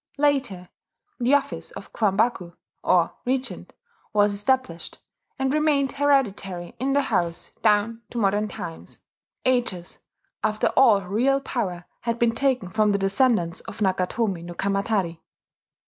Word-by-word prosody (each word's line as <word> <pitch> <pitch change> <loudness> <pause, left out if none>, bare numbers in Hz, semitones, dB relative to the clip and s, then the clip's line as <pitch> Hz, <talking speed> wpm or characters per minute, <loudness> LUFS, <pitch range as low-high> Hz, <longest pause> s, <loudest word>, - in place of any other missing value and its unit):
Later 270 -11 0 0.5
the 250 +3 +4
office 285 - -2
of - - -11
Kwambaku, 200 -4 0 0.3
or 175 -2 +3
Regent, 260 +1 -3 0.4
was 205 -1 +3
established, 205 -4 -1 0.4
and 265 0 0
remained 300 -3 +2
hereditary 210 -11 0
in 270 +2 0
the 285 0 +3
house 170 -8 -1
down 220 +1 +2
to 240 - -7
modern 205 -1 +1
times 165 -5 -8 0.5
ages 240 -9 -1 0.4
after 215 0 +1
all 220 -7 +5
real 240 +9 +1
power 185 -10 -3
had 235 -1 -2
been 235 -1 +2
taken 250 -7 0
from 215 -1 +2
the - - +2
descendants 195 -3 +2
of - - -10
Nakatomi 190 0 0
no 175 0 -8
Kamatari. 195 -3 -1
215 Hz, 130 wpm, -24 LUFS, 190-260 Hz, 0.5 s, all